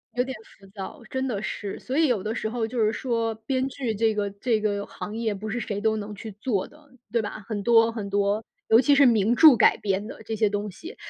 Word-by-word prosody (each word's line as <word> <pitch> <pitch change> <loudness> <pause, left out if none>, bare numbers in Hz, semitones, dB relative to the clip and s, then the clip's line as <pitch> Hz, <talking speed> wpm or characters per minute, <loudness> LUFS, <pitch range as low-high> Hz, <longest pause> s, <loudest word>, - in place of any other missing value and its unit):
有 250 - +2
点 260 0 -5 0.2
浮 195 - -17
躁， 195 +8 -8
真 260 0 -2
的 210 -6 -2
是， 200 -2 -5
所 265 - -4
以 320 -1 +4
有 230 -8 0
的 215 - -2
时 220 - -3
候 230 0 -2
就 235 +2 -4
是 215 -1 +3
说， 230 -2 -1
编 260 +1 0
剧 260 -4 -3
这 220 +1 +1
个 205 -1 -1
这 215 +3 0
个 205 -1 -1
行 210 - -7
业 225 -2 -1
不 210 +2 -6
是 240 +3 -2
谁 205 -3 -3
都 220 +1 +1
能 210 0 -6
去 220 +2 -8
做 220 -8 -1
的， 300 -1 -20 0.2
对 230 0 +2
吧？ 215 0 -6
很 215 -3 -3
多 230 +1 +5
很 215 -3 -5
多， 200 +2 +1 0.3
尤 225 +2 +7
其 285 +2 +4
是 280 0 +6
名 225 -1 +4
著 305 -1 +8
改 - - +5
编 200 +1 -2
的 220 - -10
这 220 +1 -3
些 215 -1 +2
东 205 0 -3
西， 330 - -10
220 Hz, 270 characters per minute, -25 LUFS, 205-245 Hz, 0.3 s, 著